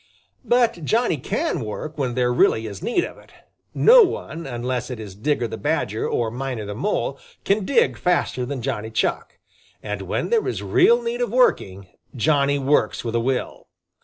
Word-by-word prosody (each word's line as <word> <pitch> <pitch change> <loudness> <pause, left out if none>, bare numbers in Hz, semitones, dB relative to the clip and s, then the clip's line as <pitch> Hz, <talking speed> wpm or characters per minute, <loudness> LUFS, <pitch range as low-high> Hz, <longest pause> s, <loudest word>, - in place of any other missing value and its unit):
But 235 -8 +2
Johnny 225 - +1
can 125 - -2
work 150 +8 -6
when 130 -5 -2
there 125 -1 +1
really 115 -2 +3
is 100 -3 -7
need 350 +9 0
of - - -8
it. - - -20 0.4
No - - +7
one, 170 - -2
unless 125 0 -3
it 125 -3 -6
is 105 -3 -8
Digger 125 +4 -1
the 110 - -7
Badger 125 -8 -1
or 115 -2 -1
Miner 125 -3 -4
the 105 - -5
Mole, 135 - -2 0.3
can 200 0 +1
dig 265 +1 +2
faster 175 -7 0
than 130 -1 -4
Johnny 110 0 -3
Chuck. 110 - -2 0.5
And - - -4
when - - -3
there 460 -2 +2
is - - -3
real 470 +6 +4
need 475 +1 -3
of - - 0
working, 100 - +1 0.3
Johnny 140 +2 +2
works 135 -5 +1
with 115 -1 -4
a 115 - +2
will. 125 +2 -3
135 Hz, 180 wpm, -22 LUFS, -, 0.5 s, No